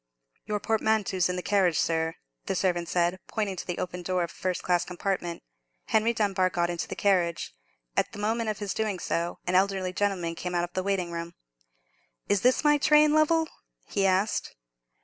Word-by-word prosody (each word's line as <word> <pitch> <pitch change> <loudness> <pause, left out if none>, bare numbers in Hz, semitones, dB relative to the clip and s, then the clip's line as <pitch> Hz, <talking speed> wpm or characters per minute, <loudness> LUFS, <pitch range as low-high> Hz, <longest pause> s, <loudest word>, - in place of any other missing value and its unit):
"Your 210 -1 -1
portmanteau's 215 -4 +1
in 180 - -1
the 180 - -4
carriage, 190 -6 +2
sir," 160 0 0 0.3
the - - 0
servant 175 -3 0
said, 175 +1 +1
pointing 210 -4 -2
to - - -6
the 175 - -3
open 180 0 -4
door 180 0 0
of 170 - -4
a - - -16
first 185 -1 -2
class 180 -1 +2
compartment. 180 -1 -3 0.5
Henry 220 +2 +3
Dunbar 200 -5 +1
got 175 -1 0
into 170 - -3
the - - -5
carriage. 180 - +1 0.4
At - - +1
the - - -10
moment 220 +2 0
of 215 - -2
his 205 -2 -3
doing 215 -3 -1
so, 170 -1 -2
an 180 - -1
elderly 190 -1 +2
gentleman 185 -4 0
came 180 +2 -4
out 175 - +2
of 175 0 -5
the 185 - 0
waiting 185 -3 -1
room. 170 0 -5 0.9
"Is 205 -2 +2
this 250 +4 +3
my 295 -1 +4
train, 300 +1 +5
Lovell?" 320 +1 +3 0.4
he 195 -1 +1
asked. 190 +3 0
185 Hz, 190 wpm, -27 LUFS, 175-210 Hz, 0.9 s, train